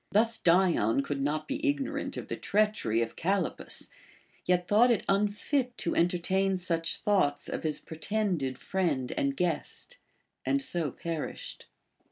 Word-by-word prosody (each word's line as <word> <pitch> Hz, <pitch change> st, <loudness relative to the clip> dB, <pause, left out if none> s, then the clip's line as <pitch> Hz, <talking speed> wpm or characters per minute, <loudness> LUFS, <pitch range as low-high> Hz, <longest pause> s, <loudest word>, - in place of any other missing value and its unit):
Thus 225 Hz, +2 st, +3 dB
Dion 165 Hz, -, +3 dB
could 140 Hz, -1 st, -3 dB
not 150 Hz, +2 st, -1 dB
be 290 Hz, +2 st, -3 dB
ignorant 285 Hz, -2 st, -1 dB
of -, -, -5 dB
the -, -, -3 dB
treachery 205 Hz, -, +1 dB
of 115 Hz, -, -6 dB
Callippus, 190 Hz, 0 st, -1 dB, 0.5 s
yet 180 Hz, -1 st, +2 dB
thought 225 Hz, +4 st, +5 dB
it 235 Hz, -, +2 dB
unfit 210 Hz, +6 st, 0 dB
to 170 Hz, -, -1 dB
entertain 185 Hz, +3 st, +2 dB
such 165 Hz, -2 st, 0 dB
thoughts 165 Hz, -9 st, +1 dB
of -, -, -3 dB
his 155 Hz, -2 st, 0 dB
pretended 160 Hz, -5 st, -2 dB
friend 160 Hz, -10 st, -1 dB
and 280 Hz, -2 st, -1 dB
guest, 180 Hz, -, -2 dB, 0.5 s
and 280 Hz, -, +2 dB
so 175 Hz, -, -1 dB
perished. 165 Hz, +3 st, -6 dB
180 Hz, 140 wpm, -29 LUFS, 155-215 Hz, 0.5 s, thought